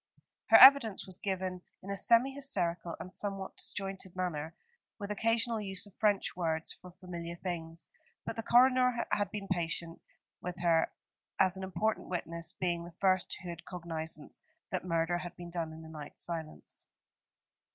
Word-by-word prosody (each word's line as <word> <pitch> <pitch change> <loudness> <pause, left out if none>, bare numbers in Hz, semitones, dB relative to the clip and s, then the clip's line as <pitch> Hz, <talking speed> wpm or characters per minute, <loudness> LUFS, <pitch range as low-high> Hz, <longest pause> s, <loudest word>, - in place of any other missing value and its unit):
Her - - +9
evidence 260 -6 +8
was 185 -1 -7
given 185 -2 -2 0.2
in 195 - -5
a - - -1
semi 235 +7 +4
hysterical 180 - -1
and 185 - -8
somewhat 195 -1 -4
disjointed 195 -2 -3
manner, 165 -3 -3 0.4
with 205 -1 -5
occasional 225 +1 +1
use 195 -1 -4
of 205 - -14
French 205 -2 +1
words 160 -2 -1
for 180 - -13
familiar 175 -1 -7
things; 170 -2 -5 0.4
but - - -3
the 225 - -2
coroner 250 +1 +5
had 205 -2 +1
been 200 -1 -5
patient 170 -2 -2 0.4
with 180 0 -5
her 165 -2 +3 0.5
as 190 -1 +4
an 190 - -6
important 190 +4 -1
witness, 170 -2 -3
being 175 -2 -1
the 170 -1 -11
first 185 -2 +2
who 180 - -6
had 170 0 -7
cognisance 160 -3 -5 0.3
that 185 - -1
murder 170 0 +1
had 175 0 -7
been 175 -1 -9
done 165 -2 -2
in 160 +1 -10
the - - -10
night 150 -2 -9
silence. 165 -2 -5
180 Hz, 160 wpm, -32 LUFS, 170-200 Hz, 0.5 s, Her